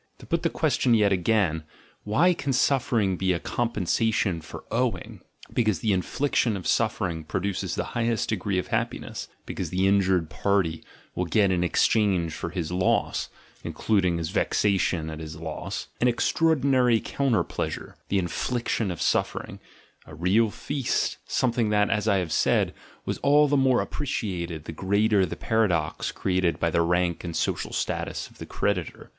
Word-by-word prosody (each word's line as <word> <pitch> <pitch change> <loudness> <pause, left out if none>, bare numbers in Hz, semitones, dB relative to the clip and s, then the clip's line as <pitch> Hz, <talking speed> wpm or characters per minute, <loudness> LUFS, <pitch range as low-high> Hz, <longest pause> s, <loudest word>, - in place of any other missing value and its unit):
To - - -13
put - - 0
the - - +1
question 120 -2 +2
yet 105 -2 +3
again, 90 -4 +1 0.4
why 150 +13 +4
can 140 -5 -2
suffer 125 -2 +2
ing 95 -3 +1
be 95 0 +1
a 85 - -2
compensation 110 -4 0
for 80 - -10
"owing"? - - -2
— - - -19
Because 110 -8 +1
the 110 - +1
inflic 115 +9 -1
tion 110 -5 +2
of 90 - -8
suffering 95 -8 0
produces 95 +4 -2
the - - -1
highest 115 -1 0
degree 100 -2 -1
of 90 - -2
happi 120 0 -1
ness, - - -7 0.2
because - - -4
the 95 +1 +1
injured 95 -4 +3
party 95 -5 0 0.3
will 90 - -1
get 100 +2 +3
in 90 -1 +1
exchange 90 -3 +2
for - - -4
his 85 -2 -4
loss 90 +1 0 0.3
(including 95 -6 +1
his 80 0 -3
vexation 95 -5 +1
at 80 - -7
his 80 -1 -7
loss) 80 0 -5
an 125 - +4
extraordi 160 +5 +2
nary 125 -4 +4
counter 135 -2 0
pleasure: - - -5
the 100 - +2
infliction 110 +4 -1
of 90 - -4
suffering - - -1 0.2
— - - -31
a 80 - -10
real 95 +7 +3
feast, 140 +4 -2
something 120 -3 +1
that, 105 -1 +2
as 105 0 0
I 100 -2 +4
have 90 -4 -2
said, - - +2 0.3
was - - -3
all 145 +1 +5
the 145 - +2
more 130 -2 +3
appreciated 90 - -3
the - - -5
greater 100 +3 +2
the - - -5
paradox 95 -9 0
created 90 -2 0
by 85 - +1
the 85 - +2
rank 85 0 +1
and 85 -2 -5
social - - -1
status - - -3
of - - -21
the - - -7
creditor. 90 -4 -2
100 Hz, 175 wpm, -26 LUFS, 90-115 Hz, 0.4 s, all